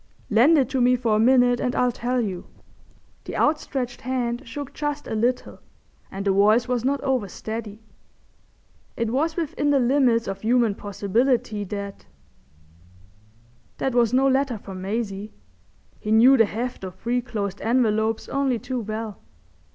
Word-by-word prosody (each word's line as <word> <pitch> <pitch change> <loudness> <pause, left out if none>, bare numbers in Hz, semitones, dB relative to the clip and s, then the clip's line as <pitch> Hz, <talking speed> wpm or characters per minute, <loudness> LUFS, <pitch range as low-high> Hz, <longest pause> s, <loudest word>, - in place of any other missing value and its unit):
"Lend 255 +10 +5
it 265 -4 +3
to 265 - 0
me 250 +1 +4
for 235 -3 +1
a - - +2
minute 245 +1 +4
and 250 - -1
I'll 250 0 +2
tell 245 +2 -2
you." 195 -6 -3 0.8
The - - -5
outstretched 270 -5 -1
hand 245 -1 -2
shook 280 +3 -7
just 295 0 -3
a - - -5
little 240 +3 -1 0.5
and 195 +1 -5
the 200 - +3
voice 215 +5 +4
was 250 -2 -1
not 275 +2 +1
over 260 -7 0
steady. 220 +2 -7 1.1
It 230 -1 -1
was 315 +6 0
within 315 -3 -1
the 285 - +4
limits 245 -2 +2
of 195 0 -5
human 235 -1 +2
possibility 210 +2 -1
that—that 200 0 -6 1.9
was 235 -2 +3
no 265 +2 +3
letter 270 -2 +1
from 190 -2 -9
Maisie. 205 0 -4 0.7
He 210 - -4
knew 240 +5 +7
the 225 -3 +5
heft 230 +2 -5
of 185 -1 -6
three 240 +5 -1
closed 205 -5 -4
envelopes 225 -2 +1
only 275 -3 0
too 250 +2 -4
well. 215 -1 -5
235 Hz, 150 wpm, -24 LUFS, 215-255 Hz, 1.9 s, knew